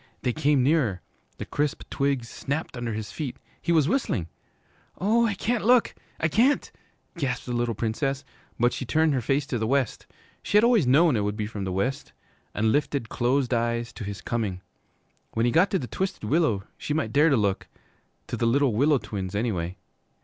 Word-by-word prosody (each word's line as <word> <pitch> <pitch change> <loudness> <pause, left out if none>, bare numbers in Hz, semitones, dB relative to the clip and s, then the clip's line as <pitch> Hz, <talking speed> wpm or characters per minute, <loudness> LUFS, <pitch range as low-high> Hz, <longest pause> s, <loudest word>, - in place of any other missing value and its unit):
They 125 -2 +1
came 145 -2 +2
nearer. 130 - +1 0.3
The - - -5
crisp 150 +1 -2
twigs 140 -4 0
snapped 140 +6 -4
under 120 -1 -3
his 105 -1 -5
feet. 145 -6 -5 0.2
He 170 - -1
was 155 -4 +4
whistling. 140 - 0 0.7
'Oh, 230 +5 +3
I 205 - -1
can't 230 +3 -1
look! 245 +2 +4 0.3
I 160 - +2
can't!' 240 - +2 0.5
gasped 130 -6 -2
the 125 - -4
little 120 -1 0
Princess, 135 +6 -2 0.3
but 120 +1 +3
she - - -4
turned 155 +4 +2
her 130 - 0
face 135 +4 0
to 125 -4 -2
the 110 - -1
west, 135 -1 0 0.3
she 205 - +2
had 210 - +6
always 235 - +4
known 150 +3 +5
it - - +1
would 105 +1 -2
be 105 - -1
from 105 -2 -5
the 95 - -2
west, 110 +9 -2 0.4
and 110 +1 +2
lifted 140 -4 0
closed 125 +1 +1
eyes 115 0 -1
to 115 - -7
his 100 0 -6
coming. 105 -6 -2 0.7
When 115 +1 +2
he 120 - +2
got 165 +7 +4
to 195 - +1
the 135 - -4
Twisted 190 - -3
Willow 115 - +1 0.2
she 150 - -2
might 140 -9 -1
dare 150 +4 +5
to 135 - +3
look 100 -3 0 0.6
to - - -4
the 115 - 0
Little 135 0 +3
Willow 140 +6 +4
Twins, 95 -5 -5
anyway. 95 -5 -2
130 Hz, 195 wpm, -26 LUFS, 110-155 Hz, 0.7 s, had